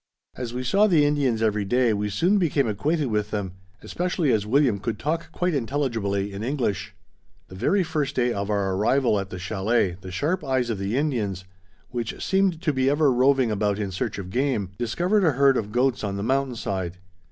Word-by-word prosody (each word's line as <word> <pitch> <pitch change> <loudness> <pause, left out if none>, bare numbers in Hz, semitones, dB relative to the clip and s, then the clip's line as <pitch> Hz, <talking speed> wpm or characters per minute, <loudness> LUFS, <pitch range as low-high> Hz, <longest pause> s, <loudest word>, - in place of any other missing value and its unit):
As 125 -2 -5
we 125 +1 -4
saw 200 - +3
the 160 -7 +4
Indians 135 -6 +1
every 105 -2 +1
day 120 +3 +2
we 105 0 -1
soon 175 - +2
became 145 -7 +1
acquainted 145 +9 0
with 105 -1 0
them, 100 -3 -3 0.3
especially 175 -5 -1
as 105 -2 +1
William 125 -4 +3
could 110 +2 -3
talk 160 +4 -3
quite 180 0 -1
intelligibly 115 -7 -1
in 100 - -6
English. 120 -7 -2 0.5
The 95 - -10
very 190 - +2
first 155 -5 -2
day 120 -1 +1
of 100 +1 -3
our 100 -2 0
arrival 110 +3 +2
at 100 -1 -5
the 90 - -6
chalet 95 0 0
the 95 - -8
sharp 150 - -1
eyes 130 -4 0
of 105 - -3
the 100 +5 -1
Indians, 110 - -1 0.5
which 120 -2 -4
seemed 190 -3 +1
to 150 - +1
be 130 0 +2
ever 145 0 +3
roving 130 -1 +3
about 105 -1 0
in 100 -2 -3
search 95 - -3
of 95 -2 -7
game, 120 -6 0
discovered 175 - +1
a 160 -5 +3
herd 135 +1 +4
of 105 -4 -2
goats 125 +1 +1
on 100 -1 -2
the 100 - -3
mountain 135 +1 0
side. 95 -5 -3
120 Hz, 200 wpm, -24 LUFS, 100-145 Hz, 0.5 s, the